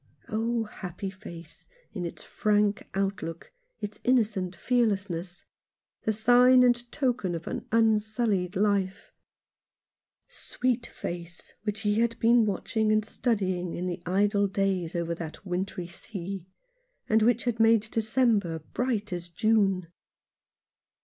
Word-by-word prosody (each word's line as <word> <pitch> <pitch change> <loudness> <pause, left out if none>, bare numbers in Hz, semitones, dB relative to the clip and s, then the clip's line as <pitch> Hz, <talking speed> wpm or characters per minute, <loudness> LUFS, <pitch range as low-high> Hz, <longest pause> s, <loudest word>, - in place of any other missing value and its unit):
Oh, 230 +1 0
happy 195 -2 -6
face, 170 -5 -11 0.3
in 180 -4 -3
its - - -9
frank 210 0 +1
outlook, 195 -4 -3 0.3
its 210 0 -5
innocent 210 -7 +1
fearlessness 195 -6 -1 0.3
— - - -56
the 220 - +3
sign 245 +4 +6
and 240 -1 +2
token 240 - 0
of 165 - -6
an - - -5
unsullied 215 -3 +2
life! 200 -1 0 1.1
Sweet 245 -1 -2
face 175 0 -7
which 210 0 -2
he 210 0 +1
had 230 0 +1
been 230 -1 +5
watching 215 +2 0
and 215 0 +2
studying 185 -7 -1
in 180 - -3
the 175 -1 -3
idle 200 +2 +2
days 190 -4 -1
over 170 -1 -1
that 165 +3 -7
wintry 180 0 -3
sea, 190 0 -7 0.6
and 220 0 +4
which 235 +2 +3
had 240 -2 -1
made 225 -1 +6
December 220 -6 +2 0.2
bright 225 -6 -1
as 175 0 -5
June 195 0 +2
205 Hz, 125 wpm, -28 LUFS, 180-225 Hz, 1.1 s, sign